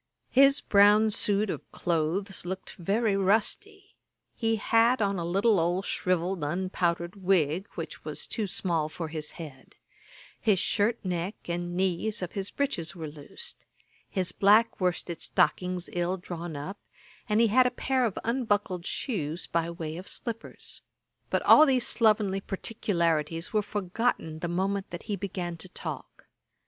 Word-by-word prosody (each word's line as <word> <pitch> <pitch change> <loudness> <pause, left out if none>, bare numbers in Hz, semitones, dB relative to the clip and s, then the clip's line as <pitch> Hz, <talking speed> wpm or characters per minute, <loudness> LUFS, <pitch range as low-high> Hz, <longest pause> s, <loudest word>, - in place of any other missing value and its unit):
His 275 +2 +5
brown 210 +2 +5
suit 205 0 +2
of - - -8
cloaths 175 +4 -1
looked 185 +2 -6
very 205 +4 +1
rusty; 225 - 0 0.4
he 225 -1 +1
had 230 +3 +3
on 200 -3 0
a - - -2
little 195 +4 +3
old 175 +4 0
shrivelled 180 0 -1
unpowdered 175 +2 -1
wig, 185 -1 +1
which - - -6
was - - -5
too 215 -3 -2
small 165 -4 -1
for 160 +1 -5
his 155 -1 -5
head; 145 -6 -11 0.6
his 210 -4 +3
shirt 210 +5 +2
neck 180 +3 -2
and 175 0 -3
knees 190 +3 0
of 175 - -4
his 195 -1 -2
breeches 175 - -2
were 160 -2 -5
loose; 150 - -9 0.6
his 185 -3 0
black 210 +2 +4
worsted 175 -2 -1
stockings 180 -1 +1
ill 175 +2 0
drawn 175 -2 -6
up; 150 +8 -6 0.5
and 210 +1 +3
he 230 -1 +5
had 250 +4 +5
a - - +2
pair 260 +1 0
of 225 -6 -1
unbuckled 205 -7 0
shoes 170 - -3
by 170 0 -1
way 165 -2 -5
of 185 - -8
slippers. 230 -2 -5 0.5
But - - 0
all 310 - +8
these 255 -3 +3
slovenly 210 -4 +3
particularities 170 -5 -1
were 215 - +3
forgotten 200 -4 -2
the 175 - -3
moment 190 +3 -1
that 175 - -7
he 205 - -2
began 180 -3 -4
to 180 +3 -7
talk. - - -7
190 Hz, 150 wpm, -28 LUFS, 170-215 Hz, 0.6 s, all